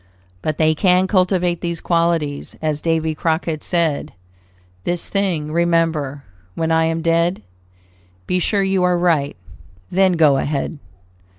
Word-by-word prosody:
But 155 -1 -2
they 155 0 +3
can 180 +3 +3
cultivate 180 -2 +1
these 170 -1 -3
qualities, 165 -4 0
as 155 -1 -2
Davy 160 -1 0
Crockett 160 0 -1
said: 165 -5 -1 0.7
"This 175 -1 -3
thing 180 -7 -1
remember, 165 -4 0 0.3
when 165 0 -1
I 160 0 +3
am 165 0 -1
dead: 170 - +1 0.8
Be 180 - 0
sure 200 +2 +1
you 190 -1 +1
are 180 0 +3
right, 160 -5 +1 0.6
then 190 0 +3
go 155 -5 +4
ahead." 145 +2 -2
165 Hz, 130 wpm, -19 LUFS, 155-180 Hz, 0.8 s, go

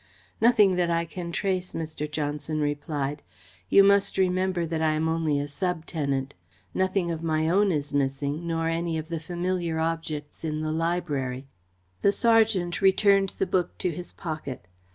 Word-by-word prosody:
"Nothing 215 -5 +5
that 175 -1 +2
I 170 0 +1
can 170 0 -6
trace," 185 0 -1
Mr. 155 -2 -4
Johnson 150 +1 -3
replied. 145 -1 -2 0.5
"You 200 - +7
must 200 0 +4
remember 185 -1 +1
that 160 0 -2
I 155 -1 +3
am 155 +1 0
only 160 -3 +1
a 145 - -2
sub 175 +2 -2
tenant. 140 -4 -2 0.4
Nothing 185 -2 0
of 165 -1 -4
my 160 -1 0
own 195 +4 +3
is 145 -3 -2
missing, 140 +3 -1
nor 165 -1 0
any 165 0 -1
of 160 +1 -5
the 165 -1 -2
familiar 175 0 -2
objects 160 -2 -3
in 155 -1 -2
the 155 0 -1
library." 155 -6 -1 0.6
The 200 - +5
sergeant 220 -8 +3
returned 195 0 +4
the - - +1
book 180 -2 -1
to 180 - -1
his 175 +2 -7
pocket. 155 - -6
165 Hz, 165 wpm, -26 LUFS, 150-180 Hz, 0.6 s, You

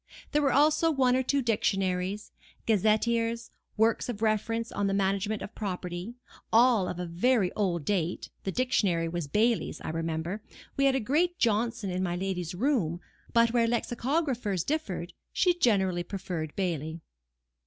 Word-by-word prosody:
There 300 - +2
were 275 -2 +3
also 310 +4 +4
one 260 -5 +3
or 260 - +2
two 275 +1 0
dictionaries, 195 -3 0 0.3
gazetteers, 230 +2 +1 0.3
works 225 +3 +2
of 225 -2 -4
reference 225 +1 0
on 205 0 -1
the 195 - 0
management 200 +2 0
of - - -8
property; 180 +1 -5 0.4
all 230 -4 +5
of 180 - -4
a 180 - -3
very 185 +4 +1
old 175 -7 -1
date 180 -4 -1
(the 190 - -2
dictionary 195 -9 +1
was 170 -2 -3
Bailey's, 220 +8 +1
I - - -5
remember; 165 +4 -3 0.3
we 275 - +2
had 270 -1 +4
a - - +2
great 325 +10 +1
Johnson 225 -2 0
in 180 +1 -2
my 175 -2 -1
lady's 180 -2 -3
room, 195 - 0 0.3
but 230 0 +4
where 235 -1 +3
lexicographers 240 - -1
differed, 310 +6 -3 0.2
she 360 -2 +3
generally 190 - +2
preferred 175 -4 -5
Bailey). 165 -4 -2
210 Hz, 155 wpm, -28 LUFS, 180-240 Hz, 0.4 s, all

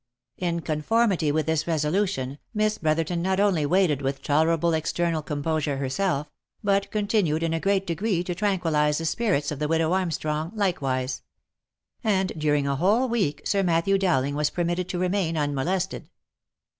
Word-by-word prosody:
In 170 -2 -1
conformity 165 +1 +1
with 155 0 0
this 160 +1 0
resolution, 150 -3 -1 0.2
Miss 215 0 +1
Brotherton 165 +2 0
not 190 +2 0
only 185 -8 +2
waited 170 -5 +2
with 135 0 -3
tolerable 165 +3 +2
external 165 +1 0
composure 150 -1 -2
herself, 140 +2 -1 0.4
but 200 -1 +1
continued 205 -7 0
in 165 -1 0
a 165 - 0
great 195 +1 +1
degree 175 +1 -1
to 180 - -3
tranquillize 165 -6 +1
the 165 - -3
spirits 160 -6 0
of 145 - -5
the 150 - 0
widow 165 +1 +1
Armstrong, 160 -3 -1
likewise; 135 -10 -1 0.8
and 190 -4 +1
during 150 -2 +1
a 140 -1 0
whole 210 - +3
week, 210 - -1
Sir 200 - +2
Matthew 180 +2 +2
Dowling 145 -8 +1
was 150 0 +1
permitted 175 +1 -2
to 180 - -2
remain 180 -2 0
unmolested. 155 +6 -1
165 Hz, 155 wpm, -25 LUFS, 150-190 Hz, 0.8 s, whole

